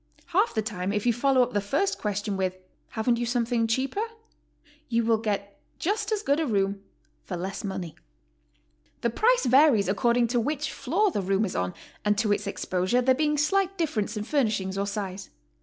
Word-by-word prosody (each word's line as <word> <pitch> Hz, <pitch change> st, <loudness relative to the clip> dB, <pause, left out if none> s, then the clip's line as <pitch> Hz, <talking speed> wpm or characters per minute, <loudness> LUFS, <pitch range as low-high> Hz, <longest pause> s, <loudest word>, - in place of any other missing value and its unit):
Half 400 Hz, -, +3 dB
the 220 Hz, -, +1 dB
time 200 Hz, -3 st, -3 dB
if 210 Hz, +1 st, -1 dB
you 240 Hz, -, +4 dB
follow 260 Hz, +2 st, +3 dB
up 245 Hz, -, -4 dB
the 205 Hz, -, +1 dB
first 285 Hz, -, 0 dB
question 205 Hz, -1 st, -2 dB
with, 185 Hz, -1 st, -1 dB, 0.4 s
''Haven't 235 Hz, +2 st, +2 dB
you 240 Hz, -, -1 dB
something 235 Hz, -1 st, +1 dB
cheaper?" 260 Hz, -, 0 dB, 0.9 s
you 235 Hz, -1 st, +2 dB
Yfill 225 Hz, -1 st, +2 dB
get 200 Hz, -2 st, -3 dB, 0.2 s
just 410 Hz, +5 st, -1 dB
as 425 Hz, -1 st, 0 dB
good 285 Hz, -4 st, +2 dB
a 320 Hz, -, 0 dB
room 200 Hz, -3 st, 0 dB, 0.4 s
for 180 Hz, -, -5 dB
less 190 Hz, +3 st, -4 dB
money. 190 Hz, -5 st, -4 dB, 1.1 s
The 235 Hz, -, +1 dB
price 480 Hz, -, +3 dB
varies 255 Hz, -, +5 dB
according 235 Hz, +4 st, +2 dB
to 240 Hz, 0 st, +1 dB
which 300 Hz, +5 st, -2 dB
floor 360 Hz, +10 st, +1 dB
the 205 Hz, -, -1 dB
room 195 Hz, +3 st, +1 dB
is 190 Hz, -, -5 dB
on, 90 Hz, 0 st, -1 dB, 0.3 s
and 210 Hz, 0 st, +2 dB
to 210 Hz, -1 st, +1 dB
its 205 Hz, -, -3 dB
exposure, 185 Hz, +3 st, 0 dB
there 260 Hz, +1 st, +5 dB
being 300 Hz, +2 st, +1 dB
slight 385 Hz, +6 st, +1 dB
difference 235 Hz, -, -1 dB
in 210 Hz, -, -2 dB
furnishings 215 Hz, -8 st, 0 dB
or 200 Hz, +1 st, -1 dB
size. 195 Hz, -1 st, -5 dB
230 Hz, 190 wpm, -27 LUFS, 200-275 Hz, 1.1 s, varies